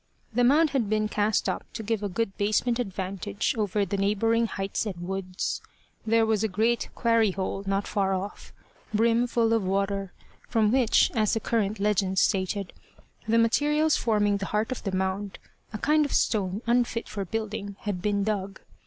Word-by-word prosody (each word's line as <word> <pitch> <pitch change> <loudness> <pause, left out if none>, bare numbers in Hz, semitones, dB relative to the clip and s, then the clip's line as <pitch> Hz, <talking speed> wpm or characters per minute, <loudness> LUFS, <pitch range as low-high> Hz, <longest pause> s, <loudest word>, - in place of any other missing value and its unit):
The 245 +2 +2
mound 295 +5 +4
had 250 -7 0
been 215 0 +1
cast 210 0 +1
up - - -2
to 225 - -5
give 220 0 -1
a 205 - -2
good 195 0 -2
basement 215 +4 +1
advantage 190 - -2
over 210 -2 0
the 200 +2 -2
neighbouring 225 +4 +2
heights 195 +1 -3
and 175 -3 -5
woods. 190 -1 -3 0.5
There 225 0 +4
was 220 -1 +1
a - - +2
great 220 +4 0
quarry 230 -3 +3
hole 195 +1 -3
not 195 +1 0
far 195 -2 0
off, 195 +2 -6 0.4
brim 230 +2 +3
full 230 -1 +2
of 225 -3 +2
water, 195 0 -1 0.4
from 215 -3 +2
which, 250 -2 +4
as 215 0 +2
the - - +1
current 215 -2 -1
legend 195 -2 +1
stated, 190 0 +1 0.5
the 225 +1 +3
materials 295 +7 +3
forming 210 -3 +2
the 195 -1 -4
heart 215 +3 -1
of 255 - -3
the 195 - -3
mound 190 +1 -2 0.3
a 215 - -4
kind 300 +7 +3
of 285 - -3
stone 200 -1 +1
unfit 235 -1 +1
for 200 - -4
building 205 0 -4
had 200 -4 -3
been 205 0 0
dug. 195 -2 -2
210 Hz, 180 wpm, -27 LUFS, 195-230 Hz, 0.5 s, mound